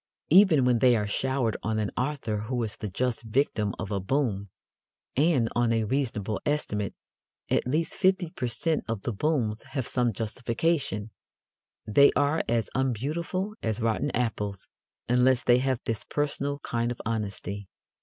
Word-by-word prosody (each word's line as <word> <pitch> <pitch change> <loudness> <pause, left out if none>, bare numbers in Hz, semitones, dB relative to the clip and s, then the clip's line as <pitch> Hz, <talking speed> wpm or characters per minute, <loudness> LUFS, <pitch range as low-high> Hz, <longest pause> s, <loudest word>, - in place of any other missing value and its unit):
Even 170 -7 +7
when 125 -2 +3
they 125 -1 +5
are 105 -2 0
showered 125 +1 0
on 110 +2 -1
an 105 -2 -1
author 125 -5 -1
who 125 -1 -1
is 110 -1 -3
the 105 - -5
just 120 +4 -1
victim 110 -3 0
of 95 - -5
a 100 - 0
boom 100 -2 -1 0.7
and, 140 -5 +3
on 120 -1 +2
a 115 -1 +2
reasonable 110 -5 -1
estimate, 105 -9 -1 0.6
at - - +2
least 155 +6 0
fifty 185 -3 +2
per 125 - -3
cent 150 +8 0
of 115 -3 -3
the 120 - -2
booms 115 -4 0
have 130 -2 -4
some 125 -2 +1
justification 115 - -1 0.7
they 140 +7 +6
are 145 +2 +2
as 115 -1 +1
unbeautiful 155 - -1
as 110 -1 -1
rotten 115 -1 0
apples 105 -5 -2 0.4
unless 125 +1 +3
they 120 0 +5
have 130 -1 0
this 115 -2 -2
personal 145 -1 -1
kind 120 0 -1
of 120 - -6
honesty. 100 -3 -3
120 Hz, 155 wpm, -27 LUFS, 110-140 Hz, 0.7 s, Even